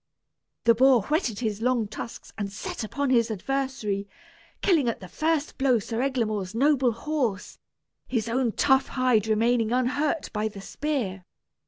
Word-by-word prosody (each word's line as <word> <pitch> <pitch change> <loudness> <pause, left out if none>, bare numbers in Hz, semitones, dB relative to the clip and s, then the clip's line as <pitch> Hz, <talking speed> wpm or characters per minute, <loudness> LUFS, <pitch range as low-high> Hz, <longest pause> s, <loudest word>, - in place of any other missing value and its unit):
The 230 - +6
boar 255 -1 +5
whetted 265 - -1
his 215 -2 -2
long 240 -2 +1
tusks 225 +2 -8
and 200 -2 -4
set 210 - -5
upon 275 +5 -1
his 235 -2 +3
adversary, 220 -3 -2 0.5
killing 320 -11 +3
at 230 - -3
the 185 - -9
first 310 - -1
blow 265 -3 +4
Sir 225 +2 -3
Eglamour's 220 -7 -1
noble 270 -1 +3
horse, 240 -5 -2 0.5
his 230 -3 -1
own 235 -1 0
tough 265 -1 +3
hide 250 -5 +2
remaining 225 +1 +2
unhurt 285 +5 0
by 215 0 0
the 205 -2 -8
spear. 200 -4 -3
240 Hz, 150 wpm, -26 LUFS, 215-270 Hz, 0.5 s, The